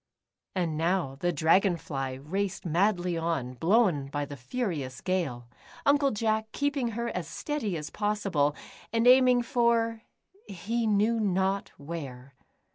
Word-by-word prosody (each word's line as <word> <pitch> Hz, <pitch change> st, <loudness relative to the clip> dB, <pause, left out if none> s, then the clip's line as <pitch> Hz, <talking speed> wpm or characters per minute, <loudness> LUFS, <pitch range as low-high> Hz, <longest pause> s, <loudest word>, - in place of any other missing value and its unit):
And 170 Hz, -4 st, -1 dB
now 170 Hz, -4 st, +1 dB
the 175 Hz, +2 st, +1 dB
Dragon 175 Hz, +3 st, +3 dB
fly 135 Hz, -4 st, -4 dB
raced 185 Hz, +9 st, -3 dB
madly 175 Hz, 0 st, +1 dB
on, 160 Hz, -7 st, -2 dB
blown 165 Hz, -, +2 dB
by 145 Hz, +1 st, -3 dB
the 145 Hz, -, -8 dB
furious 140 Hz, -, -4 dB
gale, 150 Hz, -11 st, -2 dB, 0.4 s
Uncle 280 Hz, 0 st, +4 dB
Jack 220 Hz, -1 st, -1 dB
keeping 285 Hz, -2 st, 0 dB
her 235 Hz, 0 st, -1 dB
as 180 Hz, -7 st, -4 dB
steady 215 Hz, -, -3 dB
as 150 Hz, 0 st, -6 dB
possible, 195 Hz, -9 st, 0 dB, 0.4 s
and 230 Hz, +1 st, +1 dB
aiming 250 Hz, -1 st, +6 dB
for 235 Hz, -2 st, +1 dB, 0.2 s
— 395 Hz, +2 st, -32 dB
he 220 Hz, +5 st, -2 dB
knew 215 Hz, +2 st, +2 dB
not 195 Hz, -1 st, 0 dB
where. 140 Hz, -4 st, -7 dB
190 Hz, 135 wpm, -28 LUFS, 155-230 Hz, 0.4 s, aiming